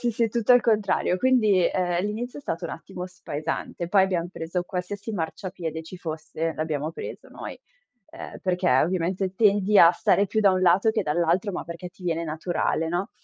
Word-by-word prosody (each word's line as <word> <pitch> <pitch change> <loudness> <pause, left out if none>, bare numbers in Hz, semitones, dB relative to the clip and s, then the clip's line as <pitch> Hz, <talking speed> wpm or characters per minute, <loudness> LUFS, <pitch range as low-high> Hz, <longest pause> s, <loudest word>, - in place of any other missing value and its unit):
sì, 240 - +1
sì, 230 +1 +1
è - - +1
tutto 235 +2 +3
al 245 - +7
contrario. 210 -5 +1
Quindi, 215 -6 +3
ehm, 180 0 0
l'inizio 235 +6 -4
è 285 - -11
stato 170 -6 -4
un 170 - -4
attimo 180 +1 -7
spaesante, 165 -1 -5
poi 195 +1 +5
abbiam 180 -3 0
preso 175 0 -3
qualsiasi 195 +4 -5
marciapiede 165 -2 -4
ci 165 +3 -10
fosse, 160 -1 -4
l'abbiamo 155 -1 -2
preso - - -8
noi, - - -8 0.5
ehm, - - -9
perché 180 -1 0
ovviamente 180 +6 +1
tendi 205 -1 +4
a 170 - +9
stare 200 - +2
più 220 +3 0
da 200 -2 +5
un 185 - +1
lato 185 +5 +4
che 220 - 0
dall'altro, 170 +6 +1
ma - - -4
perché 170 +2 -7
ti 185 +1 -19
viene 170 -1 -1
naturale, 160 0 -1
no. 175 +4 -2
180 Hz, 190 wpm, -25 LUFS, 170-205 Hz, 0.5 s, a